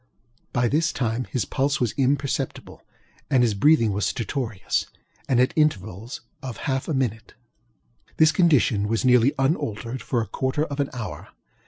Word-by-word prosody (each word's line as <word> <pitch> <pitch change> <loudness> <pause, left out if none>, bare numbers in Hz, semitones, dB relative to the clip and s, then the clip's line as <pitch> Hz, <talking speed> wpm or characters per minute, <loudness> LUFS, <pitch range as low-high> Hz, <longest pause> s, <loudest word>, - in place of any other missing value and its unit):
By 120 -1 +1
this 155 +6 +1
time 120 0 -2
his 125 -7 -2
pulse 140 +2 0
was 120 -4 +1
imperceptible 140 +1 -1 0.5
and 130 -2 +4
his 115 -3 +2
breathing 115 0 +4
was 100 +1 0
stertorous, 115 -3 -2 0.4
and 125 -3 +3
at 130 +1 +3
intervals 115 - -1 0.2
of 130 -3 -6
half 135 -1 -1
a 160 - -1
minute. 115 -4 -2 0.8
This 155 -1 +6
condition 145 - +3
was 115 +3 0
nearly 125 +1 +4
unaltered 130 - -1
for 120 - -1
a 115 - -1
quarter 130 +3 -1
of 145 -2 -6
an 140 - 0
hour. 120 -3 -6
130 Hz, 155 wpm, -24 LUFS, 115-140 Hz, 0.8 s, This